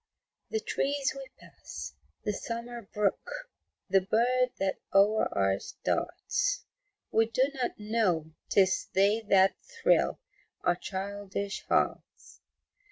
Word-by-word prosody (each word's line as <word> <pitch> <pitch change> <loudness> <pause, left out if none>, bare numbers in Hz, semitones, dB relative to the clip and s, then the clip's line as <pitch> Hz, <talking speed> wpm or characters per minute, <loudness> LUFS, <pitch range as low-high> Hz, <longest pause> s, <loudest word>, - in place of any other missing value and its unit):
The 440 - 0
trees 280 -1 0
we 270 -1 -7
pass, - - -9 0.3
the 210 - 0
summer 235 +3 -5
brook, - - -1 0.4
The 195 - +4
bird 245 +6 +2
that 190 0 -1
o'er 205 +3 +4 0.2
us 95 - -6
darts - - 0 0.5
We 225 0 +4
do 240 +3 +2
not 255 -3 -2
know 210 -8 0 0.2
'tis 190 -2 +3
they 200 +4 +4
that 195 0 +5
thrill 465 -2 +2 0.4
Our 175 - +3
childish 200 +1 -4
hearts. - - -1
210 Hz, 110 wpm, -30 LUFS, 195-250 Hz, 0.5 s, that